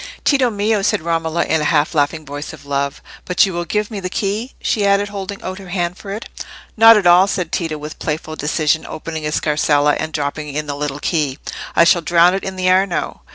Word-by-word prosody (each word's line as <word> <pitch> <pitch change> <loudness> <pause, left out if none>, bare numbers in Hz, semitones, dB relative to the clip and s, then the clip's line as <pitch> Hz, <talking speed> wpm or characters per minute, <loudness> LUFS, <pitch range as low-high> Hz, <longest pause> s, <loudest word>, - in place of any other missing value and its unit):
"Tito 270 -4 +3
mio!" 210 0 0
said 195 -5 0
Romola, 165 0 0
in 160 - 0
a - - -1
half 150 +1 +2
laughing 155 +1 0
voice 145 +2 -7
of 155 - -13
love; 140 0 -2 0.2
"but 180 - +3
you 190 - -4
will 175 0 -3
give 210 +5 -2
me 210 - -4
the 185 -1 -4
key?" 210 +6 -3
she 210 - 0
added, 200 0 +2
holding 200 0 -6
out 185 +1 -5
her 190 -2 -11
hand 175 -1 -2
for 200 - -11
it. 210 +3 -5 0.5
"Not 225 0 +8
at 205 - 0
all!" 175 +2 +6
said 180 -3 -2
Tito, 165 -3 -2
with 150 +1 -8
playful 155 0 -4
decision, 155 +1 0
opening 160 0 -6
his 150 0 -2
scarsella 150 -1 +2
and 160 - -3
dropping 150 0 -3
in 150 0 -2
the 145 - -4
little 145 0 -4
key. 145 -5 -1 0.4
"I - - +6
shall 175 0 +4
drown 170 +2 +4
it 195 - -2
in 190 - -5
the 185 0 -1
Arno." 185 0 +1
170 Hz, 225 wpm, -18 LUFS, 150-195 Hz, 0.5 s, Not